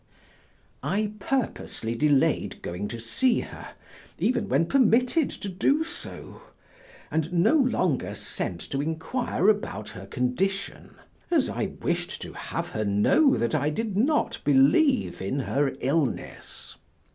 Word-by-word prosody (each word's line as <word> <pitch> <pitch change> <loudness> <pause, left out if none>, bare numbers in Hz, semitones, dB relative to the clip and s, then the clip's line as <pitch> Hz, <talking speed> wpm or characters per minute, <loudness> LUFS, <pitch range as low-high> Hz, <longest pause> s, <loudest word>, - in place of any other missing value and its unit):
I 205 +9 -1
purposely 210 - -2
delayed 145 +2 +1
going 90 +4 -4
to 120 - -6
see 230 - +1
her - - -10 0.4
even 255 - 0
when 165 - +3
permitted 255 - +3
to - - -7
do 275 - +2
so, 340 +7 -8 0.7
and 160 +1 -1
no 175 - +3
longer 245 - +1
sent 85 - -4
to 135 - 0
inquire 160 - -1
about 205 - +1
her 95 +1 -9
condition, 185 - -2 0.3
as 325 -6 +2
I 195 -2 -3
wished 175 0 -1
to - - -8
have - - -4
her 110 - -2
know 105 - +4
that 115 - 0
I 150 -1 +2
did 210 +5 -3
not 280 +9 +1
believe 145 - +3
in 130 +9 -1
her 140 +1 0
illness. 140 -1 -2
170 Hz, 130 wpm, -26 LUFS, -, 0.7 s, know